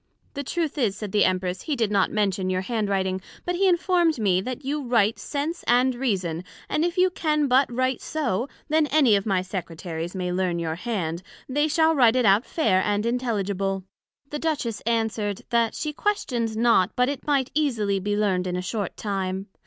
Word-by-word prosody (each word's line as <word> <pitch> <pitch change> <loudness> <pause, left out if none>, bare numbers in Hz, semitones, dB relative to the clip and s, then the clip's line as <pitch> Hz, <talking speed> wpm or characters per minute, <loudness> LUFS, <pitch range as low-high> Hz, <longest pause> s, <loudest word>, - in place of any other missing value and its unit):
The 280 - -4
truth 320 +1 -2
is, 215 -7 +1
said 210 -3 -5
the 205 0 +4
Empress, 185 0 -1
he 300 - -2
did 225 -5 0
not 200 -2 +3
mention 195 -3 0
your 185 0 0
hand 215 0 -2
writing; 190 -1 0 0.2
but 355 - -1
he 385 +2 +2
informed 345 -3 +2
me, 190 -5 +2
that 255 +5 -6
you 290 +2 -1
writ 230 -4 +2
Sense 305 +4 -3
and 250 +2 +4
Reason, 190 -10 -1 0.2
and 305 - 0
if 350 +2 -1
you 365 0 +4
can 305 -4 +1
but 260 0 +3
write 255 +1 0
so, 265 -5 -2 0.2
that 310 -1 +2
any 275 -8 +5
of 200 +1 -1
my 190 -3 +1
Secretaries 175 -2 -5
may 180 -1 -2
learn 180 -1 0
your 165 -1 -2
hand, 175 -4 -3 0.3
they 295 +3 +1
shall 320 +1 +3
write 250 -5 +5
it 250 -2 +2
out 205 +4 +4
fair 190 - +2
and 205 +1 0
intelligible. 200 -6 -1 0.5
The 295 - -3
Duchess 275 -10 -2
answered, 220 -3 -1
That 235 -1 +2
she 305 -1 -3
questioned 245 - -1
not 225 -4 +3
but 250 0 +3
it 280 +1 -4
might 275 -3 +1
easily 225 -10 +1
be 205 +2 -1
learned 190 -3 +1
in 180 - -2
a 180 - -1
short 200 0 -3
time. 195 -2 -2
225 Hz, 195 wpm, -25 LUFS, 190-280 Hz, 0.5 s, any